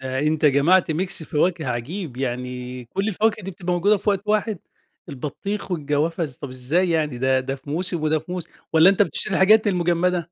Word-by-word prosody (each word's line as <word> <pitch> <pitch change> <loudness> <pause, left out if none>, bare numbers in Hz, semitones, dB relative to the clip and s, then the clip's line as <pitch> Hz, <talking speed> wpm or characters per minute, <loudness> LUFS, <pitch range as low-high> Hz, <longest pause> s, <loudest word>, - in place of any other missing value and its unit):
ده 130 0 -3
أنت 155 +2 0
جمعت 155 +5 +4
ميكس 180 +2 -1
فواكه 160 +1 0
عجيب، 130 - -4
يعني 125 -1 -4
كلّ 195 - -2
الفواكه 220 +1 0
دي 190 - -5
بتبقى 180 -1 -4
موجودة 200 +4 +3
في 205 - 0
وقت 200 -1 -1
واحد؟ 215 -1 0 0.5
البطيخ 190 +10 -5
والجوافة 155 +1 0
إز 140 -5 -8
طَب 140 - -7
إزاي 140 +9 0
يعني؟ 150 -6 0
ده، 130 0 +2
ده 135 +1 -3
في 135 +1 -11
موسم 175 +1 -2
وده 155 0 +2
في 160 +4 -9
موسم، 180 -2 -5 0.2
والّا 160 +4 +7
أنت 200 - +3
بتشتري 190 -1 -1
الحاجات 215 +4 +5
المجمدة؟ 175 -1 +1
165 Hz, 190 wpm, -22 LUFS, 135-185 Hz, 0.5 s, والّا